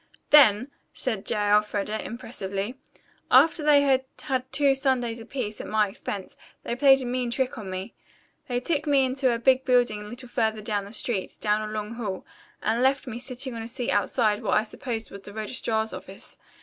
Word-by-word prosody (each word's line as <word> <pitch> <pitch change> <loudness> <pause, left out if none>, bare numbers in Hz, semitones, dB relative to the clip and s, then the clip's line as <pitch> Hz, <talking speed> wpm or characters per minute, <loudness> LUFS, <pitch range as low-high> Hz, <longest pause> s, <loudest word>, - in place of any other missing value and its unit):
"Then," 260 -3 +6 0.2
said 220 -7 -1
J. - - +2
Elfreda 210 0 +1
impressively, 215 -3 -4 0.6
"after 305 +5 +5
they 295 -1 +5
had 265 -2 +3 0.2
had 260 -2 -2
two 280 -1 +3
sundaes 255 -4 0
apiece, 225 -2 -5
at - - -8
my 215 -1 +2
expense, 195 0 -6 0.3
they 235 - -3
played 270 0 +5
a - - -5
mean 245 0 -1
trick 255 +2 -1
on 210 -4 -7
me. 185 +1 -5 0.5
They 245 -2 -1
took 305 +2 -1
me 275 -2 +4
into 260 0 +1
a 235 - 0
big 260 +2 +3
building 245 -5 +2
a - - -8
little 240 +4 -9
further 220 -3 0
down 205 -2 -1
the 200 - -11
street, 215 -3 -3
down 215 0 0
a - - -7
long 215 +1 -4
hall, 210 -6 -5 0.4
and 225 +3 +1
left 265 +1 +2
me 240 -2 -6
sitting 255 0 -4
on 230 - -5
a 225 - -6
seat 245 0 -3
outside 210 +1 +1
what 220 - +2
I 215 - +2
supposed 225 0 -5
was 200 - -9
the 205 +1 -8
registrar's 220 0 -2
office. - - -9
235 Hz, 195 wpm, -26 LUFS, 210-260 Hz, 0.6 s, Then